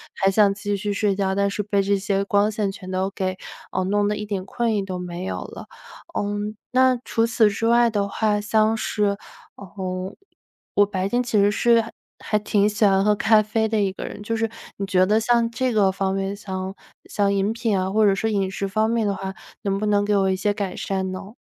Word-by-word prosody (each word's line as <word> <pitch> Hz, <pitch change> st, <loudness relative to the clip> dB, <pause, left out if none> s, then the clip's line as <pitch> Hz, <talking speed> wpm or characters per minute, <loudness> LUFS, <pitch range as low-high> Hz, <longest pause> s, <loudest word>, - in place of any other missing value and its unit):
还 195 Hz, -1 st, +2 dB
想 205 Hz, 0 st, +4 dB
继 205 Hz, 0 st, -2 dB
续 205 Hz, +1 st, -3 dB
睡 205 Hz, -1 st, +1 dB
觉， 190 Hz, -1 st, 0 dB
但 200 Hz, 0 st, +2 dB
是 210 Hz, -, -2 dB
被 200 Hz, -1 st, 0 dB
这 200 Hz, +1 st, +2 dB
些 195 Hz, 0 st, 0 dB
光 205 Hz, +1 st, +2 dB
线 205 Hz, -2 st, -1 dB
全 190 Hz, -1 st, -10 dB
都 190 Hz, +1 st, -1 dB
给， 185 Hz, -2 st, -3 dB, 0.3 s
呃， 185 Hz, -, -1 dB
弄 205 Hz, +2 st, +1 dB
得 210 Hz, 0 st, -1 dB
一 210 Hz, -, -4 dB
点 200 Hz, -3 st, -3 dB
困 235 Hz, +1 st, -1 dB
意 205 Hz, -, +1 dB
都 185 Hz, -1 st, -5 dB
没 180 Hz, 0 st, -6 dB
有 -, -, -3 dB
了。 -, -, -10 dB, 0.5 s
嗯， 205 Hz, +1 st, -2 dB, 0.2 s
那 255 Hz, 0 st, +4 dB
除 225 Hz, -1 st, +1 dB
此 225 Hz, -2 st, +4 dB
之 215 Hz, +3 st, -1 dB
外 235 Hz, 0 st, +5 dB
的 205 Hz, -2 st, -1 dB
话， 210 Hz, 0 st, 0 dB
像 215 Hz, +1 st, +2 dB
是， 205 Hz, -2 st, 0 dB, 0.4 s
呃， 185 Hz, -1 st, -6 dB, 0.6 s
我 205 Hz, -, +5 dB
白 190 Hz, -1 st, -2 dB
天 240 Hz, +5 st, +1 dB
其 230 Hz, -3 st, 0 dB
实 200 Hz, +1 st, +4 dB
是 230 Hz, +1 st, +3 dB, 0.4 s
还 210 Hz, -, 0 dB
挺 205 Hz, -1 st, +2 dB
喜 210 Hz, +1 st, -1 dB
欢 195 Hz, -1 st, +4 dB
喝 210 Hz, +1 st, +4 dB
咖 220 Hz, +1 st, +4 dB
啡 220 Hz, +1 st, 0 dB
的 220 Hz, -1 st, 0 dB
一 195 Hz, -1 st, +1 dB
个 -, -, -7 dB
人， -, -, -8 dB
就 225 Hz, +2 st, -2 dB
是 225 Hz, 0 st, 0 dB, 0.3 s
你 195 Hz, -, -2 dB
觉 185 Hz, -2 st, +3 dB
得 210 Hz, +3 st, +3 dB
像 230 Hz, +1 st, +2 dB
这 250 Hz, +1 st, -1 dB
个 200 Hz, -3 st, +3 dB
方 190 Hz, 0 st, -1 dB
面， 195 Hz, 0 st, -2 dB
像 190 Hz, -1 st, -5 dB, 0.3 s
像 200 Hz, -1 st, 0 dB
饮 200 Hz, +1 st, +1 dB
品 225 Hz, -3 st, 0 dB
啊， 185 Hz, 0 st, -1 dB
或 215 Hz, +1 st, +3 dB
者 200 Hz, -, +5 dB
是 220 Hz, +3 st, -1 dB
饮 195 Hz, -2 st, 0 dB
食 195 Hz, +1 st, -3 dB
方 215 Hz, +3 st, +1 dB
面 230 Hz, -1 st, +1 dB
的 200 Hz, -, +1 dB
话， 190 Hz, 0 st, -5 dB, 0.3 s
能 195 Hz, -2 st, 0 dB
不 215 Hz, -, -1 dB
能 205 Hz, -1 st, +2 dB
给 210 Hz, 0 st, +1 dB
我 195 Hz, -1 st, +2 dB
一 190 Hz, -, +1 dB
些 205 Hz, +2 st, 0 dB
改 200 Hz, -2 st, -4 dB
善 190 Hz, -1 st, -2 dB
呢？ 195 Hz, +3 st, -8 dB
205 Hz, 250 characters per minute, -23 LUFS, 195-215 Hz, 0.6 s, 外